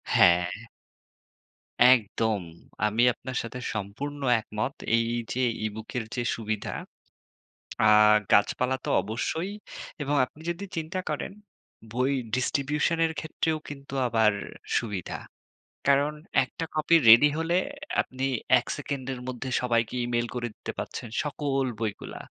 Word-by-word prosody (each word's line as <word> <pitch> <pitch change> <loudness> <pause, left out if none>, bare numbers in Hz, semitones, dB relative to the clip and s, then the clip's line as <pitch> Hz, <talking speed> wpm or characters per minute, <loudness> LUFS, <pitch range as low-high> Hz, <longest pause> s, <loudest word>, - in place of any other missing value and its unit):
হ্যাঁ। 85 0 +6 1.4
একদম, 110 -3 +2 0.4
আমি 105 +3 +1
আপনার 125 +1 -6
সাথে 115 +2 -6
সম্পূর্ণ 125 +9 -5 0.2
একমত। 110 +5 -3 0.2
এই 115 0 +2 0.3
যে 130 - -3 0.3
e-book 110 +1 -6
এর 120 - -1
যে 120 - -1
সুবিধা, 110 -2 -3 1.2
আর 105 0 +7 0.2
গাছপালা 125 +5 +3
তো - - -2
অবশ্যই। 160 - -2 0.5
এবং 145 +1 0
আপনি 130 +5 -16
যদি 175 +4 -4
চিন্তা 165 +3 -2
করেন, 150 +4 -3 0.6
বই 130 +3 +1 0.2
distribution 145 +5 +1
এর 160 - -3
ক্ষেত্রেও 160 0 -1
কিন্তু 140 -1 -8
আবার 110 -2 +4 0.5
সুবিধা। 105 -6 -4 0.7
কারণ 140 +2 +4 0.3
একটা 165 - -6
copy 155 +2 +3
ready 120 +6 +9
হলে, 165 +2 +1 0.4
আপনি 130 +1 -3 0.3
১ 120 - -5
সেকেন্ডের 135 -3 -4
মধ্যে 130 +1 -4
সবাইকে 115 -2 +1
e-mail 120 0 0
করে 120 -1 -2
দিতে - - -6
পারছেন, 120 - -5 0.2
সকল 140 -2 -1 0.2
বইগুলা। 110 -3 -4
125 Hz, 120 wpm, -27 LUFS, 110-145 Hz, 1.4 s, ready